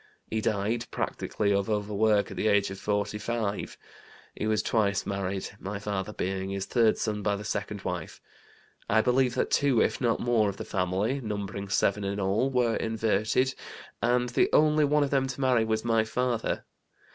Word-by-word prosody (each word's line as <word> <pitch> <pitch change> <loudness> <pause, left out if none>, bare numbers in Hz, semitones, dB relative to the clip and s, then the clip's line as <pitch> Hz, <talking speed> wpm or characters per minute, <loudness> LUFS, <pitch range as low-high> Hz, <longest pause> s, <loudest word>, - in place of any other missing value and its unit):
He 110 - 0
died, 110 +3 -1
practically 100 -1 -1
of 100 +1 0
overwork, 105 0 +1
at - - -8
the - - +1
age 100 -2 +3
of 95 - -7
45. 105 +1 -2 0.6
He 105 - -3
was 110 -1 +1
twice 100 -4 +1
married, 95 -1 -3
my 100 +1 -4
father 100 0 -3
being 95 -1 -3
his 100 0 -3
third 115 -3 +3
son 105 -2 -2
by 100 0 +1
the 100 - -6
second 100 -1 -4
wife. - - -4 0.7
I 110 +1 +4
believe 125 +1 +2
that - - 0
two, 140 -5 +3
if - - +1
not 120 -3 +2
more, 115 -4 +2
of 100 - -6
the - - -6
family 95 +9 -1
(numbering 100 -2 -4
seven 100 +1 +1
in 100 +1 -2
all) 100 +7 +1
were 125 -3 +1
inverted, 110 +3 +1 0.5
and 125 +1 +2
the 120 - +2
only 155 0 +4
one 150 +1 +3
of 140 - -2
them 135 -1 +2
to 130 0 -6
marry 130 -4 +3
was 110 0 -1
my 115 -1 +3
father. 120 +1 -1
110 Hz, 180 wpm, -28 LUFS, 100-120 Hz, 0.7 s, I